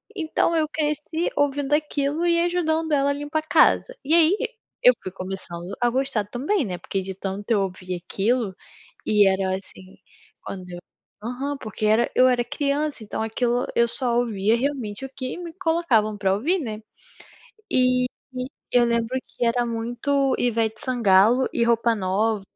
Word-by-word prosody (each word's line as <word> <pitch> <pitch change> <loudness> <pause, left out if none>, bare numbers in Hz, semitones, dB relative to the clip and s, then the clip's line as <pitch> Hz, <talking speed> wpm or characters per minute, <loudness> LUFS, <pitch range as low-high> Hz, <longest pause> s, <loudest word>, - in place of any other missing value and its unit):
Então 335 -1 0
eu 315 -1 +2
cresci 305 +2 -2
ouvindo 285 0 0
aquilo 300 +1 0
e 340 -1 +3
ajudando 325 -2 0
ela 280 -1 +3
a - - +1
limpar 290 +2 -2
a 310 - -10
casa. - - +4
E 300 - 0
aí, 335 +3 +6
e 485 - -1 0.4
eu - - +7
fui 185 - -5
começando 185 -1 -6
a 240 - +4
gostar 260 -4 -1
também, 280 - -1
né, 180 -3 -4
porque 195 - -3
de 190 +1 -5
tanto 195 +3 -5
eu 210 -3 +4
ouvir 185 -1 -4
aquilo, 210 +1 0 0.5
e 210 -1 +4
era 190 0 +1
assim, 190 0 -11 0.4
quando 185 -2 -7
eu 175 - -7 0.4
aham, 265 +5 -3
porque 215 -2 -4
era 220 +3 +3
eu 255 0 +6
era 245 -1 +2
criança 285 -2 -1
então 210 - -4
aquilo 240 +2 0
eu 235 0 +4
só 240 -1 -1
ouvia 220 -3 +1
realmente 255 -3 -3
o - - -7
que 260 +1 -6
me 345 -2 -7
colocavam 320 - +1
pra 195 -2 +1
ouvir, 295 - +1
né. 220 -7 -5 0.9
E 255 0 +3 0.7
e 245 - +6
eu - - +5
lembro 235 +2 0
que 240 - -3
era 240 +1 +2
muito 245 +4 0
Ivete 225 -2 0
Sangalo 235 0 +4
e 235 - +2
Roupa 230 0 +2
Nova. 205 +2 0
245 Hz, 170 wpm, -24 LUFS, 210-290 Hz, 0.9 s, eu